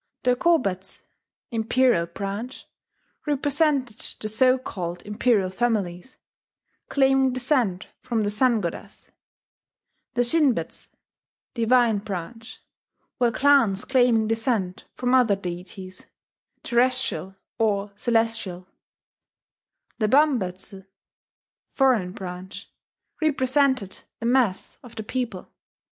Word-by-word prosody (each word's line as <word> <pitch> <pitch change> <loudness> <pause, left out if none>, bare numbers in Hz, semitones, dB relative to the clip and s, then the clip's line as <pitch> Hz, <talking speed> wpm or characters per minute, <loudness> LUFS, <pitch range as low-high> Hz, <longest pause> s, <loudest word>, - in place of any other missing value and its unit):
The 250 0 +3
Kobetsu 200 - 0 0.5
("Imperial 230 -5 +2
Branch") 200 +8 -6 0.6
represented 285 -4 +1 0.2
the 215 - -4
so 255 +4 +3
called 180 -8 -6
imperial 210 -2 +1
families, 205 -1 -2 0.7
claiming 270 -1 +3
descent 245 -8 0 0.2
from 225 -3 -1
the 205 - -1
Sun 235 +1 +2
goddess; 170 -3 -7 1.0
the 245 - +3
Shinbetsu 245 - 0 0.7
("Divine 235 -2 +3
Branch") 210 +4 -7 0.6
were 240 -1 +4
clans 260 -8 +3
claiming 245 -4 +3
descent 225 -5 -1
from 250 0 -1
other 245 -6 +4
deities, 185 0 -8 0.6
terrestrial 245 -5 0 0.2
or 205 -2 0
celestial; 225 -5 -1 1.3
the 215 - +2
Bambetsu 200 -8 +1 0.9
("Foreign 245 -10 +3
Branch") 185 +2 -8 0.5
represented 265 -7 +1 0.2
the 230 - -5
mass 235 -6 +1
of 240 -2 -14
the 220 - -5
people. 230 -5 -4
225 Hz, 95 wpm, -24 LUFS, 195-255 Hz, 1.3 s, were